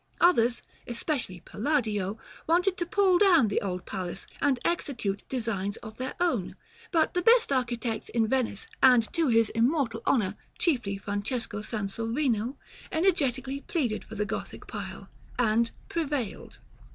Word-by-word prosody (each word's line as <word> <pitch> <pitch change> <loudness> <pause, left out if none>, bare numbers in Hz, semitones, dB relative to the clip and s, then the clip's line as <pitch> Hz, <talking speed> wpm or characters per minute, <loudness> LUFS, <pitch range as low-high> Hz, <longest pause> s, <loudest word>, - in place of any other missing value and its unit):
Others, 245 -9 +4 0.2
especially 235 - -2
Palladio, 215 -6 -1 0.3
wanted 360 +3 +3
to 345 - -2
pull 385 -3 +4
down 340 - +6
the 200 - 0
old 180 -3 -3
palace, 185 -1 -4 0.2
and 275 -3 +2
execute 235 - -1
designs 215 -5 -2
of 215 -1 -9
their 260 +1 -4
own; 320 - 0 0.3
but 325 -5 +2
the 355 - +1
best 460 -2 +5
architects 240 -3 -1
in 230 -2 +1
Venice, 245 -4 0 0.2
and 250 -4 +5
to 330 -2 +2
his 230 -3 +4
immortal 235 -1 +1
honor, 210 -6 +2 0.2
chiefly 240 - 0
Francesco 205 +2 -3
Sansovino, 225 +4 -1 0.3
energetically 280 -6 +1
pleaded 255 -12 -1
for 220 - -10
the 210 0 0
Gothic 205 - -5
pile, - - -7 0.3
and 230 -1 +3 0.2
prevailed. 290 -9 -3
240 Hz, 135 wpm, -28 LUFS, 215-300 Hz, 0.3 s, down